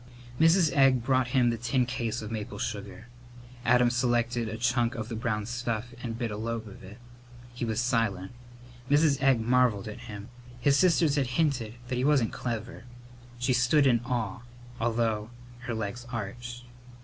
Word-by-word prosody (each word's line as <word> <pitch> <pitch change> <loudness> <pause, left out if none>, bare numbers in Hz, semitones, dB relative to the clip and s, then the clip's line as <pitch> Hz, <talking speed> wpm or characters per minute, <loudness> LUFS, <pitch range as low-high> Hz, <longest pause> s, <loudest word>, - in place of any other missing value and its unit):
Mrs. 165 -1 +4
Egg 135 -3 +4
brought 130 0 +2
him 125 -1 +3
the 115 - -4
tin 125 +2 +1
case 120 -3 -3
of 110 - -6
maple 105 -2 -5
sugar. 105 +1 -5 0.6
Adam 125 +1 +4
selected 120 -2 0
a 110 - -5
chunk 120 +1 +1
of 110 -1 -5
the 115 - -4
brown 110 -2 -2
stuff 120 0 -3
and 115 -2 -4
bit 120 -2 -2
a 105 - -4
lobe 115 0 -4
of 100 - -12
it. 100 +3 -11 0.6
He 120 0 -3
was 110 -1 -1
silent. 115 -6 0 0.6
Mrs. 145 -1 +3
Egg 135 -3 +4
marvelled 120 -3 +2
at 105 +2 -7
him. 105 +2 -8 0.3
His 140 +3 +3
sisters 160 -3 +3
had 135 -3 +1
hinted 130 -9 0
that 125 - -2
he - - 0
wasn't 140 -5 +3
clever. 115 -1 -5 0.5
She 125 +2 +1
stood 130 +4 +4
in 120 -3 +4
awe, 120 -1 -2 0.4
although 115 -2 0 0.4
her 120 - -2
legs 110 +3 -5
ached. 120 +2 -6
120 Hz, 170 wpm, -28 LUFS, 110-125 Hz, 0.6 s, Mrs